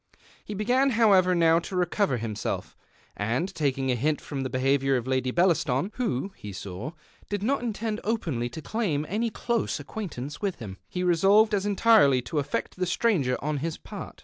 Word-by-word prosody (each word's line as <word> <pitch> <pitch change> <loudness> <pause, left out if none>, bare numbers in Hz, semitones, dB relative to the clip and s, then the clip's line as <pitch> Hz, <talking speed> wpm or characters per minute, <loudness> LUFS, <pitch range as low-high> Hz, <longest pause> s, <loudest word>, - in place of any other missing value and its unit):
He 210 - -6
began, 250 +7 +2
however, 190 -5 +5
now 165 -1 +4
to 185 - -7
recover 180 - +1
him 110 -2 -4
self; - - -4 0.4
and 125 - -1
taking 135 -5 0
a - - +1
hint 150 +5 0
from 140 -2 -5
the 130 - -2
behaviour 135 +1 +2
of 120 - -4
Lady 130 -1 0
Bellaston, 170 0 +2
who, 200 - -2
he 105 - -8
saw, 100 - -6 0.4
did 205 -1 -2
not 275 +4 +1
intend 220 -2 -3
openly 160 - -1
to 150 +6 -8
claim 180 -10 -1
any 225 +5 -1
close 235 +1 -1
acquaintance 150 - -6
with 200 -3 -1
him, 100 -4 -8
he 180 - -3
resolved 195 +5 +4
as 205 0 +1
entirely 205 - +5
to 150 +5 -2
affect 140 - -3
the 185 0 -1
stranger 170 - +1
on 150 0 -1
his 160 +3 -3
part. - - -9
165 Hz, 180 wpm, -27 LUFS, 130-205 Hz, 0.4 s, however